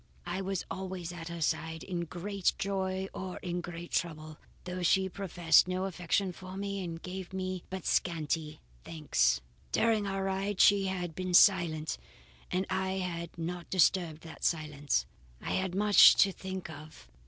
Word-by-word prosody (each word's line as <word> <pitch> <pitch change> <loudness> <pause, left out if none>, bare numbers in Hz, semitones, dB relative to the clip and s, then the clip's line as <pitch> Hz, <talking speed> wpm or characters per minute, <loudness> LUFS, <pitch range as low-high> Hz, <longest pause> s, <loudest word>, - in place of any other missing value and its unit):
I 175 +2 -3
was 195 -1 -3
always 185 -2 -5
at 165 -2 -7
her 170 -1 -6
side 160 +1 -1
in 175 -2 -3
great 185 +3 -1
joy 190 -1 -2
or 185 -1 -5
in 175 -1 -2
great 175 0 -8
trouble, 155 -3 -3 0.2
though 180 0 -5
she 190 +2 +3
professed 180 -3 +3
no 185 +1 -1
affection 185 +1 0
for 185 +1 -9
me 200 -1 -3
and 165 -2 -5
gave 185 +1 -7
me 185 -1 -3
but 190 -2 -6
scanty 155 -2 -1 0.2
thanks." 65 - +1 0.3
"During 220 -3 +2
our 195 0 -2
ride 195 +1 -2
she 200 -1 +6
had 180 -3 -3
been 185 +1 -1
silent 170 -6 +4 0.5
and 185 +1 0
I 190 0 -1
had 170 -3 -4
not 170 +1 -5
disturbed 175 -3 +2
that 160 - -11
silence. 150 -3 0 0.3
I - - -5
had 185 -1 -1
much 205 0 +8
to 195 - +5
think 190 0 -6
of. 155 - -11
180 Hz, 160 wpm, -31 LUFS, 165-190 Hz, 0.5 s, much